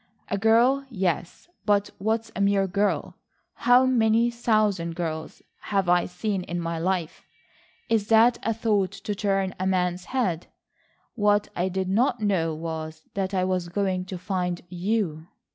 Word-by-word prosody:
"A 200 - 0
girl, 235 +6 +4
yes. 185 - -2 0.2
But 205 -1 +2
what's 225 +2 -1
a 200 - -2
mere 200 -1 +3
girl? 200 +2 -1 0.4
How 245 +2 +4
many 235 -2 +3
thousand 210 -8 +1
girls 160 -2 -5 0.2
have 195 -3 -1
I 175 0 +3
seen 195 +2 -2
in 175 0 -3
my 165 -1 -3
life? 175 -2 -2 0.6
Is 220 -3 +1
that 230 +2 +5
a 225 - 0
thought 210 -4 0
to 195 +1 -4
turn 195 -2 0
a 185 - 0
man's 180 -1 0
head? 190 -11 -1 0.7
What 205 -2 +2
I 180 +2 0
did 190 0 -2
not 235 +5 +2
know 180 -7 0
was 160 0 -6
that 195 0 -2
I 185 - +2
was 185 -2 -1
going 185 0 -1
to 185 0 -6
find 180 -1 -2
you." 180 -3 -2
195 Hz, 155 wpm, -25 LUFS, 180-220 Hz, 0.7 s, that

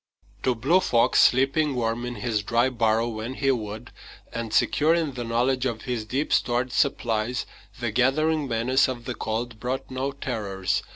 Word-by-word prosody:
To 130 -2 +1
Blue 140 +11 +3
Fox, 120 -8 +3
sleeping 135 +3 +3
warm 120 0 -1
in 120 - -5
his 110 -1 -1
dry 120 +4 +2
burrow 115 -2 +1
when 115 +3 -5
he 135 0 +2
would, 110 -3 -5 0.4
and 115 -1 -4
secure 155 +8 +3
in 160 -5 -1
the 125 -1 -4
knowledge 125 +3 +1
of 115 -3 -4
his 120 -4 -3
deep 135 +7 -1
stored 120 +1 +1
supplies, 120 -3 0 0.3
the 120 -2 -2
gathering 145 +5 +2
menace 125 +3 +2
of 120 -2 -5
the 125 - -3
cold 115 0 -4
brought 130 +3 -4
no 130 +2 -2
terrors. 105 -9 -2
120 Hz, 170 wpm, -25 LUFS, 115-130 Hz, 0.4 s, Blue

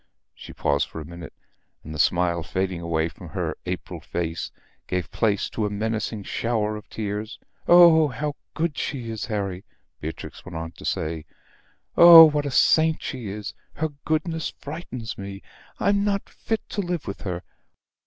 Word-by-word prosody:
She - - -11
paused 70 0 0
for - - -7
a 75 - -7
minute, 85 -1 -9 0.5
and 80 - -8
the 75 - -6
smile 85 +3 +2
fading 95 +1 -2
away 80 -1 0
from 80 - -11
her - - -2
April 90 -1 -4
face, 80 +1 -3 0.4
gave 90 -1 -2
place 100 +1 +1
to 105 -2 -1
a - - -3
menacing 110 0 -2
shower 110 0 -1
of 105 - -10
tears; 105 +1 -4 0.3
"Oh, 170 -3 +8
how 145 +3 -3 0.2
good 160 -2 0
she 120 -5 -3
is, 110 -1 -4
Harry," 100 -4 -3 0.4
Beatrix 80 +1 -7
went 95 - -9
on 80 0 -5
to - - -12
say. 80 -1 -2 0.7
"Oh, 170 -1 +12
what 150 -2 +1
a - - -1
saint 160 +4 +4
she 125 -5 -5
is! 105 +1 -5 0.2
Her 160 0 -1
goodness 160 +1 -1
frightens 130 -8 -6
me. 100 0 -7 0.4
I'm 200 0 +2
not 200 -1 0
fit 225 -1 -4
to 205 - -2
live 175 -4 -3
with 100 - -5
her. 90 -2 -4
105 Hz, 165 wpm, -24 LUFS, -, 0.7 s, Oh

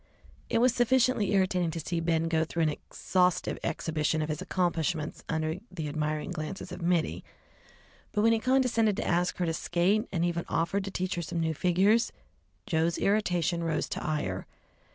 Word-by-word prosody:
It - - +1
was 245 +1 +4
sufficiently 245 -3 +2
irritating 185 -3 +2
to 165 +1 -4
see 170 +2 -2
Ben 165 0 +1
go 160 -1 +2
through 165 +1 -1
an 155 - +3
exhaustive 180 +4 0
exhibition 155 -1 0
of 155 - -4
his 155 -1 -3
accomplishments 170 -3 -1
under 160 +2 -1
the 165 -5 -5
admiring 155 +3 -2
glances 175 +2 -5
of 180 - -7
Mittie, 170 -1 0 0.9
but 210 - +1
when 230 0 +5
he 225 - +2
condescended 240 -4 +2
to - - -2
ask 175 +1 +1
her 180 - 0
to 165 - 0
skate, 185 +7 +1
and 170 -2 0
even 170 -1 -1
offered 190 +4 0
to - - -3
teach 185 0 -2
her 175 - -2
some 170 +1 -3
new 160 -1 0
figures, 190 - +3 0.5
Joe's 165 -4 +1
irritation 180 -5 +1
rose 160 -2 -1
to - - -4
ire. 150 -13 -2
175 Hz, 175 wpm, -29 LUFS, 160-195 Hz, 0.9 s, when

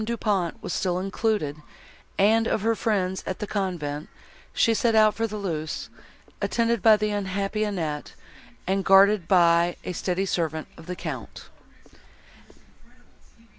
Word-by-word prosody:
Du 235 +2 -2
Pont 195 -7 -1
was - - -4
still 180 -2 0
included, 190 -5 -1 0.6
and 225 +3 +4
of 210 - -1
her 225 +1 +3
friends 190 -4 -1
at 185 - -3
the - - -4
convent, 170 -8 -3 0.4
she 230 - +3
set 225 0 +1
out 215 -1 +5
for 225 0 -1
Thoulouse, 180 -8 -4 0.5
attended 235 -2 0
by 220 -1 +6
the 210 0 -1
unhappy 200 +1 -2
Annette, 165 -8 -3 0.5
and 195 +1 0
guarded 195 -1 +5
by 170 -1 +4
a 180 - -4
steady 185 +2 -1
servant 160 -4 -2
of 165 - -14
the 180 - -4
Count. - - -7
195 Hz, 135 wpm, -25 LUFS, 175-215 Hz, 0.6 s, by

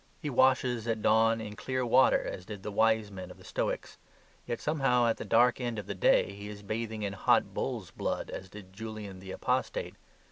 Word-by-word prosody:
He 150 -4 -4
washes 125 -2 +3
at 110 -2 -1
dawn 115 +1 +4
in 105 -2 -6
clear 130 +3 -2
water 120 - +5
as 90 - -5
did 105 -3 -7
the 105 - -4
Wise 110 0 +2
Man 95 -2 -7
of - - -12
the - - -16
Stoics, - - -3 0.5
yet, 120 - -2
somehow 135 -5 +2
at 115 - +2
the - - -5
dark 125 +2 +4
end 120 -2 -2
of 105 - -4
the - - -4
day, 100 - +3
he 100 +1 -8
is 105 -1 -9
bathing 110 +1 -3
in 100 -1 -2
hot 100 - +2
bull's - - -3
blood, - - -3
as 95 - -7
did 95 -1 -12
Julian 105 -2 -7
the 95 0 -11
Apostate. - - -1
110 Hz, 210 wpm, -30 LUFS, 100-120 Hz, 0.5 s, water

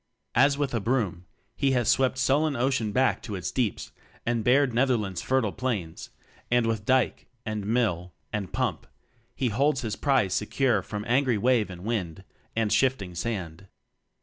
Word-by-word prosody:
As 140 +3 +4
with 145 -3 -1
a 115 - +1
broom, 100 -7 -1 0.3
he 135 -1 +1
has 120 -3 +1
swept 130 +1 +3
sul 135 +3 +3
len 155 -2 0
ocean 120 -3 0
back 130 +4 +2
to 105 - -6
its 90 - -4
deeps 115 -7 -2 0.3
and 115 -1 0
bared 130 +1 +3
Netherland's 115 -7 +1
fertile 130 -6 +1
plains; 105 -11 -4 0.4
and 120 -1 +3
with 110 -2 -1
dyke, 130 0 +1 0.2
and 105 -2 -3
mill, 105 -7 0 0.2
and 100 -5 -3
pump - - -2 0.5
he 125 - 0
holds 135 +5 +1
his 110 -4 -3
prize 130 -10 +1
secure 110 +1 +1
from 105 +2 -6
angry 125 -1 +2
wave 120 -1 +2
and 90 -1 -9
wind 95 -6 -3 0.3
and 110 -2 +1
shifting 125 -9 +1
sand. 90 -2 -4
115 Hz, 165 wpm, -27 LUFS, 100-130 Hz, 0.5 s, As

